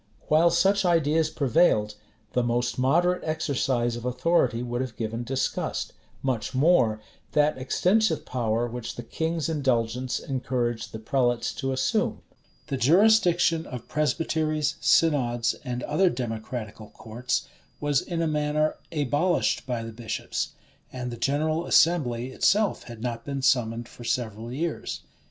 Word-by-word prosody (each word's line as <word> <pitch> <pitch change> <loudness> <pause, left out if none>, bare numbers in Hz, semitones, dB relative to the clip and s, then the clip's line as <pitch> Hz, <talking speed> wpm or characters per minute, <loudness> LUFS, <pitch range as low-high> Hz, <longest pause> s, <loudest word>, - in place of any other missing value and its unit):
While 160 +3 +5
such 195 +4 +3
ideas 160 -3 +2
prevailed, 135 -7 +2 0.4
the 125 - +2
most 120 0 -1
moderate 175 +8 +2
exercise 130 -6 0
of 120 - -7
authority 125 -2 +1
would 120 0 -2
have 130 -4 -5
given 115 +1 -3
disgust; 130 +2 -2 0.3
much 130 -1 -2
more, 130 -7 +3 0.3
that 150 -2 +2
extensive 180 +7 +1
power 115 -2 -1
which 120 0 -6
the 120 - -6
king's 160 +6 -2
indulgence 130 -5 0
encouraged 125 -3 -2
the - - -6
prelates 120 +1 0
to 135 -1 -3
assume. 130 0 0 0.4
The 135 - -3
jurisdiction 175 - +4
of 125 -3 -8
presbyteries, 155 0 0
synods, 120 -7 +3
and 125 -1 -4
other 175 +5 +2
democratical 110 -3 -5
courts, 120 +2 -3 0.3
was 145 -2 +1
in 170 -1 -2
a - - +1
manner 150 0 0
abolished 150 0 +1
by 120 -2 -2
the 115 0 -7
bishops; 115 -1 -4 0.4
and 125 -1 -5
the - - -5
general 155 +6 0
assembly 130 -7 +3
itself 210 +9 +2
had 115 -2 -9
not 115 -2 -3
been 140 -2 -4
summoned 120 -3 +1
for 120 - -12
several 115 -1 -3
years. 160 +5 -3
130 Hz, 135 wpm, -26 LUFS, 120-155 Hz, 0.4 s, While